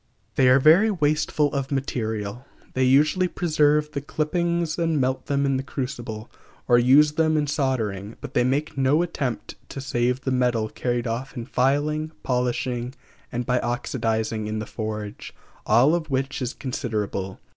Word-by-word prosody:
They 130 -1 +4
are 130 - +7
very 165 +10 +6
wasteful 150 -4 +1
of 140 -1 -2
material. 110 -4 -3 0.3
They 130 0 +2
usually 150 +8 +4
preserve 150 -3 +2
the 140 -2 -3
clippings 170 +2 -1
and 165 -3 +1
melt 130 0 -1
them 140 0 +1
in 135 -1 +1
the - - -1
crucible, 120 -5 -5 0.4
or 120 -1 +6
use 140 +5 +6
them 155 0 +2
in 150 - +1
soldering; 115 -8 -2
but - - -8
they 125 - +3
make 140 +5 0
no 135 +5 +3
attempt 140 -8 -4
to - - -6
save 125 -1 0
the 130 - -2
metal 120 -4 +1
carried 120 +1 -2
off 125 +4 -4
in 115 - -4
filing, 150 +5 0
polishing, 125 0 -1 0.4
and 120 +1 -3
by 125 0 +1
oxidizing 110 -3 -2
in 110 0 -3
the 110 - -3
forge, 105 -2 -6 0.3
all 120 +8 +5
of 165 -2 -1
which 135 +1 -2
is 125 0 -3
considerable. 105 -7 -3
130 Hz, 160 wpm, -24 LUFS, 120-150 Hz, 0.4 s, are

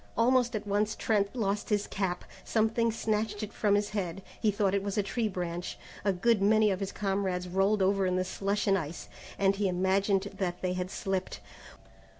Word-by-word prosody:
Almost 245 +1 +3
at 215 0 -3
once 210 +1 0
Trent 205 0 0
lost 205 -3 -1
his 210 -1 +1
cap. 185 -2 -2 0.2
Something 225 +1 +1
snatched 215 -1 -1
it 210 - -6
from 205 -2 +2
his 205 0 0
head, 195 -3 -3 0.2
he 220 - +3
thought 200 -2 +1
it 200 - +2
was 200 0 -3
a 205 - +3
tree 225 +3 -1
branch. 175 -3 -4 0.3
A 200 - +3
good 210 +3 +2
many 215 +1 +4
of 190 - -1
his 195 -1 -3
comrades 195 -3 -1
rolled 195 +3 +2
over 195 0 +2
in 180 - +1
the 185 - +1
slush 200 +2 -1
and 195 -2 +3
ice, 160 +1 -7 0.3
and 195 0 +3
he 205 -1 +1
imagined 190 +2 +1
that 180 -2 -2
they 180 0 +1
had 180 0 -3
slipped. 190 -1 -3
200 Hz, 195 wpm, -30 LUFS, 190-210 Hz, 0.3 s, many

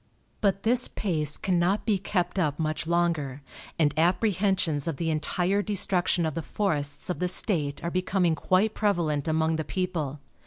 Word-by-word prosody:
But 195 -1 +1
this 245 +2 +3
pace 155 -7 -1
cannot 185 +2 +1
be 210 -4 +2
kept 180 -1 -1
up 150 -5 0
much 155 0 -2
longer, 165 -6 0 0.3
and 150 -3 +2
apprehensions 180 -3 +1
of 160 -4 -2
the 165 -1 -1
entire 180 +5 0
destruction 185 -4 +1
of 160 - -1
the 165 - -3
forests 150 -4 -2
of - - -4
the 180 - +1
state 155 -6 -2
are 170 - -2
becoming 185 -1 +1
quite 185 +6 +1
prevalent 165 -9 0
among 160 0 +1
the 160 - -2
people. 160 -5 -3
175 Hz, 160 wpm, -27 LUFS, 155-190 Hz, 0.3 s, this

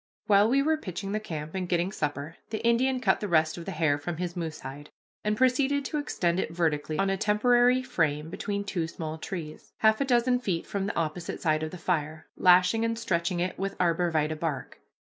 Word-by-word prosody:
While 205 +1 +5
we 275 +3 +3
were 315 +1 +2
pitching 195 - -5
the 215 - 0
camp 155 -6 -6
and 185 -2 -3
getting 175 +1 +1
supper, 150 -2 -3
the 220 +1 -4
Indian 255 +3 +3
cut 255 - +2
the 210 - -3
rest 160 -3 +2
of 170 - -8
the 195 - -4
hair 155 -4 +1
from 165 +3 -4
his 175 0 -3
moose 165 -3 -4
hide, 140 +3 -8 0.3
and 210 0 0
proceeded 265 +3 +2
to 300 - -2
extend 175 -11 0
it - - -1
vertically 155 -2 -1
on 195 +2 +1
a 195 - 0
temporary 245 +5 +3
frame 160 - -1
between 200 +2 -3
two 175 -5 -2
small 160 -1 -6
trees, 155 -3 -7
half 220 +3 +4
a - - +2
dozen 250 -1 +3
feet 185 -9 -2
from 200 -1 -2
the - - -3
opposite 165 +1 -3
side 155 -2 +1
of 155 - -2
the 185 - -8
fire, 155 -3 -2
lashing 185 +5 +5
and 230 0 0
stretching 175 -5 -1
it 180 +1 -2
with 195 +1 -2
arbor 175 0 +2
vitæ 155 0 0
bark. 155 -5 -4
180 Hz, 215 wpm, -28 LUFS, 160-220 Hz, 0.3 s, While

